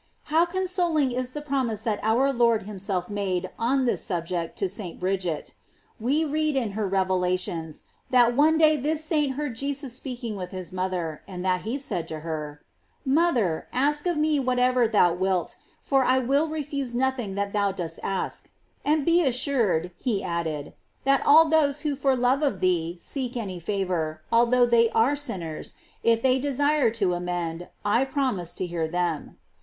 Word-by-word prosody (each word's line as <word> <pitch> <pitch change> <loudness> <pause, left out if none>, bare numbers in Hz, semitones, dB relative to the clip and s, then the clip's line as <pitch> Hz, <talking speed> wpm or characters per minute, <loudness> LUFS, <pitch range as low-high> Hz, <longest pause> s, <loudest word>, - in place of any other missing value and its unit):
* - - -42
How 330 +2 +5
consoling 350 -6 +1
is 250 0 -2
the 295 - -5
promise 260 -7 -1
that 220 -3 -1
our 250 +6 +2
Lord 235 -3 +3
himself 195 -2 -3
made 190 -3 -2
on 260 +3 +2
this 240 - 0
subject 170 -1 -3
to 195 - 0
St. 185 -2 -8
Bridget. 180 -4 -2 0.5
We 280 +8 +1
read 305 0 0
in 240 -6 0
her 210 0 -2
revelations, 180 -4 -1 0.3
that 240 -2 +4
one 310 +4 +4
day 310 -1 +5
this 305 +3 -1
saint 300 -4 +1
heard 290 -4 -3
Jesus 275 0 -3
speaking 245 -4 -5
with 185 -2 -5
his 185 -2 -6
mother, 180 -4 -3
and 185 -1 -6
that 180 -1 +1
he 230 +5 -3
said 200 - -3
to 155 -1 -6
her: 150 -2 -5 0.4
"Mother, 265 - +1
ask 295 +5 +1
of 350 -3 0
me 305 -1 +2
what 255 -1 0
ever 250 -1 +3
thou 200 -6 +4
wilt, 185 0 -1 0.2
for 270 -1 +2
I 255 +1 +3
will 275 +5 +2
refuse 285 -5 -3
nothing 250 -6 -1
that 200 0 -2
thou 200 -1 +2
dost 170 -4 -5
ask;f 195 -1 -3 0.3
and 300 -1 +1
be 340 +1 +4
assured," 235 - +1
he 220 -7 -1
added, 165 -4 -3 0.3
"that 275 0 +3
all 315 +3 +8
those 300 -2 +2
who 295 -2 -1
for 270 -1 +2
love 250 +3 +2
of 275 -11 0
thee 175 -2 0
seek 255 +4 -4
any 190 -6 -4
favor, 170 -5 -2
although 240 +1 +4
they 235 -1 +4
are 235 +6 +4
sinners, 180 - -4 0.3
if 230 0 +2
they 260 0 +3
desire 285 0 +2
to 205 -5 0
amend. 175 -1 -3 0.2
I 220 +5 +3
promise 260 - -1
to 185 - -3
hear 170 -2 -2
them."! 175 -2 -2
230 Hz, 175 wpm, -25 LUFS, 180-275 Hz, 0.5 s, all